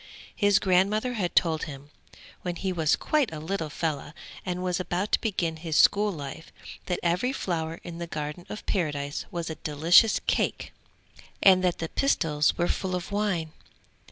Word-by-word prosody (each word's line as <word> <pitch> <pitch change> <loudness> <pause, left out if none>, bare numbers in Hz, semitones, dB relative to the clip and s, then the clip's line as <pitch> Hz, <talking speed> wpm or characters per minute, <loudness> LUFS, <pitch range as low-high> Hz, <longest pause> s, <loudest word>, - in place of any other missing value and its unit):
His 205 -1 +4
grandmother 205 +5 +2
had 195 -7 -2
told 160 -2 +2
him, 145 -1 -10 0.5
when 175 -1 -3
he 190 +1 -2
was 160 -3 +2
quite 300 - +1
a 160 - -6
little 160 0 -3
fellow 150 -1 -3 0.3
and 180 0 -3
was 180 -1 0
about 185 +3 -2
to - - +3
begin 175 -8 -1
his 160 -1 -2
school 210 +1 +5
life, 155 0 -8 0.4
that 180 - -1
every 180 +9 +1
flower 165 -9 -3
in 170 -1 -8
the 170 - -4
Garden 150 +2 -5
of 210 - -7
Paradise 145 -5 -2
was 170 -1 -4
a - - -5
delicious 165 +8 +5
cake, - - -1 0.7
and 185 -1 +7
that 180 -2 +1
the 165 - -3
pistils 160 - +1
were 175 - +1
full 185 -1 -1
of 180 +3 -5
wine. 195 -6 -1
175 Hz, 170 wpm, -27 LUFS, 160-195 Hz, 0.7 s, and